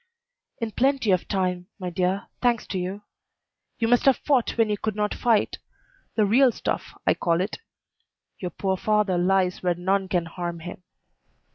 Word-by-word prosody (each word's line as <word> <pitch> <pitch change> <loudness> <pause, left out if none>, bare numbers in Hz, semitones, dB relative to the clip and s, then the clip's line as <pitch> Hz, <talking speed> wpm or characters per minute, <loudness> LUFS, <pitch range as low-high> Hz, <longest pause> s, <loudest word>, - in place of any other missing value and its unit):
"In 230 -1 -2
plenty 265 -2 +2
of 185 -1 +1
time, 180 -2 -1
my 180 -3 -4
dear; 185 +3 0 0.2
thanks 240 -2 +2
to 190 - -3
you. 190 +3 -4 0.7
You 230 - +1
must 245 +1 +3
have 270 -2 +6
fought 265 -6 +1
when 225 -1 +4
you 210 - 0
could 215 -2 -2
not 210 0 0
fight: 230 -4 +1 0.6
the 215 - +3
real 245 +5 +5
stuff, - - -4
I - - +5
call 170 -1 +1
it. 190 +3 -2 0.8
Your 180 - -3
poor 190 +2 -1
father 210 -3 +1
lies 185 0 +2
where 180 -1 +1
none 190 +2 0
can 175 -2 0
harm 170 0 -5
him. 175 +2 -8
195 Hz, 170 wpm, -25 LUFS, 180-220 Hz, 0.8 s, have